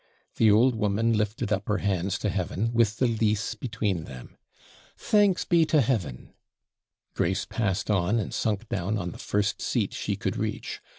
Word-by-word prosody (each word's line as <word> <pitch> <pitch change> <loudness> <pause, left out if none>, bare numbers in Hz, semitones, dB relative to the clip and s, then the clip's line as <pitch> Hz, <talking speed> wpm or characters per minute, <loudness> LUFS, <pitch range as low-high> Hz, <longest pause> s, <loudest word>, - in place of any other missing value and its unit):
The 110 - +5
old 115 +5 +5
woman 110 +1 +1
lifted 105 0 -1
up 100 0 -2
her 105 - +1
hands 95 -3 -1
to - - +2
heaven, 100 +4 -2
with 115 -2 +2
the 130 - +2
lease 110 -2 0
between 105 -7 -2
them. 65 -2 -11 0.6
'Thanks 205 -3 +2
be 170 -2 +4
to 155 0 +3
Heaven!' 110 - -1 0.8
Grace 95 +3 0
passed 105 -2 -1
on, 100 +2 +2
and 110 - -3
sunk 110 +1 -1
down 100 +3 -2
on 90 -3 -3
the - - -11
first 100 0 -1
seat - - -1
she - - -2
could - - -3
reach. - - -4
105 Hz, 170 wpm, -26 LUFS, 95-115 Hz, 0.8 s, The